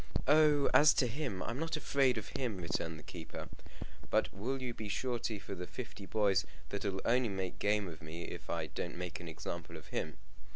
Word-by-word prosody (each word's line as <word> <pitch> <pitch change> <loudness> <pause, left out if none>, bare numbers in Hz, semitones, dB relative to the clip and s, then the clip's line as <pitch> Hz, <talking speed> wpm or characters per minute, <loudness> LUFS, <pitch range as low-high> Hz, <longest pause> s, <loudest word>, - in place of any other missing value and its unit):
"Oh, 150 -1 +6
as 150 0 +8
to 130 - +4
him, 120 -6 -2
I'm 120 +3 -3
not 165 0 0
afraid 135 -4 +3
of 110 - -4
him," 120 -7 -2
returned 85 -2 -2
the - - -11
keeper; 85 -3 -7 0.6
"but - - +2
will 125 +8 -2
you 125 -2 -3
be 110 -2 -5
surety 120 -1 -1
for 100 0 -6
the 90 -1 -5
fifty 100 0 -7
boys 100 -3 +3 0.3
that'll 100 -1 -2
only 125 0 +4
make 95 -2 -3
game 105 -1 +2
of 80 -3 -8
me 80 +2 -6
if 85 - -7
I 85 -2 0
don't 85 +2 -4
make 90 -1 -4
an 90 - -7
example 85 +1 -5
of 80 - -12
him? - - -2
100 Hz, 200 wpm, -35 LUFS, 90-125 Hz, 0.6 s, as